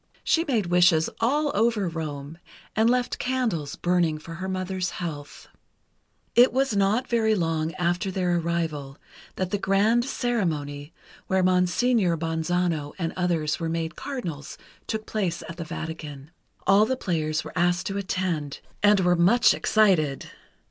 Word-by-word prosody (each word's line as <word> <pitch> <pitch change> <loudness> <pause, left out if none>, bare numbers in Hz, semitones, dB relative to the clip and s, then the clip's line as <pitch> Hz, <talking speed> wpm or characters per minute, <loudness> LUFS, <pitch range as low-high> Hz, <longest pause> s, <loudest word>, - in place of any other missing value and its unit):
She 330 - +2
made 235 - 0
wishes 175 -2 +4
all 290 +6 +1
over 215 -2 +1
Rome, 155 -1 -6 0.4
and 220 +1 +4
left 250 0 0
candles 235 - -1
burning 175 -3 +1
for 165 +2 -10
her 190 - -3
mother's 185 -1 -2
health. 150 -5 -7 0.9
It 245 +2 +6
was 265 -3 +1
not 200 +5 +2
very 220 -2 +2
long 165 -3 -1
after 175 +3 0
their 180 -2 0
arrival 160 -5 -3 0.4
that 185 -1 -3
the 205 - 0
grand 205 +5 +2
ceremony, 160 - -2 0.4
where 190 -1 +2
Monseigneur 185 +1 +2
Bonzano 160 -1 -1
and 165 -3 -2
others 170 -4 0
were 165 -1 -2
made 165 0 -3
Cardinals, 170 - -6 0.3
took 220 -1 -3
place 190 -6 -2
at 165 - -8
the 170 - -4
Vatican. 155 -3 -7 0.3
All 200 +3 +5
the 260 - -1
players 155 -6 -1
were - - -9
asked 175 +1 +1
to 200 - -3
attend, 180 -7 -2 0.2
and 205 -1 +5
were 180 -1 +3
much 190 +8 +5
excited. 180 -10 +2
180 Hz, 145 wpm, -25 LUFS, 160-210 Hz, 0.9 s, It